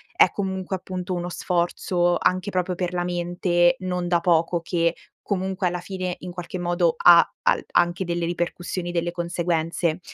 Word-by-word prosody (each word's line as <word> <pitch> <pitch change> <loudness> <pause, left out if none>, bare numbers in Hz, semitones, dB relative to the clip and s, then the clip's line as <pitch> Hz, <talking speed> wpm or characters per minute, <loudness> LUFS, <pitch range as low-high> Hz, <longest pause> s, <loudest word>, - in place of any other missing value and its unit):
è - - +6
comunque, 190 -1 -3
appunto, 185 0 -5
uno 175 0 -3
sforzo 175 0 0
anche 185 +2 +1
proprio 180 -1 -1
per 180 0 -3
la 175 - 0
mente, 175 0 +1
non 180 -1 -2
da 175 -1 +3
poco, 170 0 +2
che 170 0 0 0.3
comunque, 190 -1 -1
alla 175 0 -2
fine, 185 -1 -4
in 180 0 -7
qualche 180 +1 -6
modo, 175 -1 +1
ha 170 -1 +8 0.2
al - - +2
anche 175 +1 +2
delle 170 -1 -2
ripercussioni, 175 +1 -3
delle 170 0 -1
conseguenze. 170 -1 -1
175 Hz, 160 wpm, -24 LUFS, 175-185 Hz, 0.3 s, ha